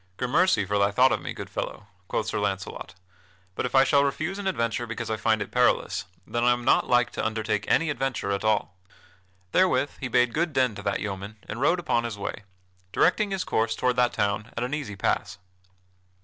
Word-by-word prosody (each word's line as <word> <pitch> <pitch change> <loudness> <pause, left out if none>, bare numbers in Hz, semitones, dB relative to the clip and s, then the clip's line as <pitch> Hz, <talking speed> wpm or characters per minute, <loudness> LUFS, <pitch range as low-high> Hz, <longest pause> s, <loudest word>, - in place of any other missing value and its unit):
"Grammercy 145 - +2
for 100 +1 0
thy 100 0 +4
thought 125 +5 +4
of - - 0
me, - - -5
good - - -7
fellow," 105 - -5 0.2
quoth 105 - -1
Sir 110 - -2
Launcelot, 95 -3 -4 0.6
"but - - -2
if - - -5
I 135 - +7
shall 140 +1 +4
refuse 155 +8 -2
an 200 - -3
adventure 120 - -1
because 115 0 -4
I - - +1
find 110 -1 +1
it - - -14
perilous, 125 -7 +2 0.2
then 120 0 -2
I 120 0 +5
am 120 0 -5
not - - +4
like 125 0 +3
to - - -4
undertake 110 -1 -1
any 165 -2 +2
adventure 135 -8 -2
at 100 +1 -1
all." 105 -4 +1 0.8
Therewith 145 -7 +3
he 135 - -3
bade 125 -1 +2
good 165 0 0
den 130 -4 +2
to 105 - -8
that 100 -1 -1
yeoman 100 0 -5
and 115 +4 -5
rode 170 +6 +3
upon 120 -8 0
his 115 -3 -4
way, 100 0 -5 0.5
directing 205 - +2
his 195 -1 -2
course 110 0 0
toward 125 -1 +1
that 125 -1 +3
town 105 +2 -1
at 120 - -1
an 125 +3 -3
easy 140 -9 -4
pass. 95 - -1
120 Hz, 210 wpm, -26 LUFS, 105-135 Hz, 0.8 s, I